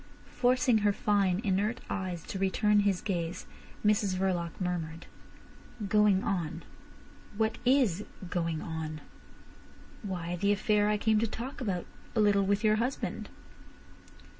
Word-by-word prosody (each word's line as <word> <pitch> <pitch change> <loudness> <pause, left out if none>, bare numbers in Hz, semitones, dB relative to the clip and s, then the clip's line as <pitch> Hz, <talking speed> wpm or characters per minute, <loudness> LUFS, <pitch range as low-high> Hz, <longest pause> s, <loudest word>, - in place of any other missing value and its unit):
Forcing 250 -2 +3
her 205 -1 +2
fine, 200 -2 +1
inert 210 +4 0
eyes 185 -4 -3
to 190 - -6
return 205 +2 +3
his 200 -3 +2
gaze, 175 -3 -3 0.4
Mrs 205 -2 +3
Verloc 185 -2 0
murmured: 170 -3 -3 0.8
"Going 210 -2 +4
on! 170 -4 -2 0.7
What 220 0 0
is 245 -8 +3 0.2
going 165 -2 -2
on?" 160 -2 -5 1.0
"Why, 175 -4 -4
the 200 +3 +2
affair 210 +1 +2
I 210 - +2
came 220 0 +2
to 230 - +1
talk 245 +6 -6
about 190 -7 -2 0.3
a - - +2
little 205 -2 +4
with 200 +2 +1
your 215 0 +4
husband." 245 +4 -2
200 Hz, 130 wpm, -30 LUFS, 180-215 Hz, 1.0 s, Going